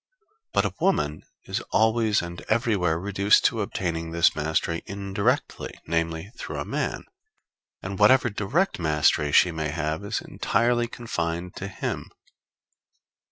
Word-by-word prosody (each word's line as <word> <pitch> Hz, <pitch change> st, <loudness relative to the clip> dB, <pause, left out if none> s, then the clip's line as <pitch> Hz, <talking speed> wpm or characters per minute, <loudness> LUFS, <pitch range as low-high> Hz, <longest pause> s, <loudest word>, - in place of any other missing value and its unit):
But -, -, +2 dB
a -, -, -2 dB
woman 75 Hz, -, +1 dB, 0.2 s
is -, -, -2 dB
always 110 Hz, -2 st, +3 dB
and 85 Hz, 0 st, -7 dB
everywhere 105 Hz, -8 st, +2 dB
reduced 100 Hz, +2 st, +3 dB
to 115 Hz, -2 st, +2 dB
obtaining 85 Hz, -4 st, -3 dB
this 85 Hz, +1 st, +3 dB
mastery 80 Hz, +2 st, -1 dB
indirectly, 100 Hz, 0 st, -2 dB
namely, 80 Hz, +3 st, -2 dB
through -, -, -6 dB
a -, -, -3 dB
man; -, -, -2 dB, 0.8 s
and 95 Hz, 0 st, -5 dB
whatever 120 Hz, +3 st, +5 dB
direct 105 Hz, -, 0 dB
mastery 75 Hz, -2 st, +2 dB
she 90 Hz, -, +5 dB
may 80 Hz, -2 st, -2 dB
have 80 Hz, +3 st, -2 dB
is 100 Hz, -, -2 dB
entirely 120 Hz, 0 st, +1 dB
confined 90 Hz, -7 st, -4 dB
to 100 Hz, -, -4 dB
him. 100 Hz, -, -4 dB
95 Hz, 130 wpm, -25 LUFS, 80-110 Hz, 0.8 s, whatever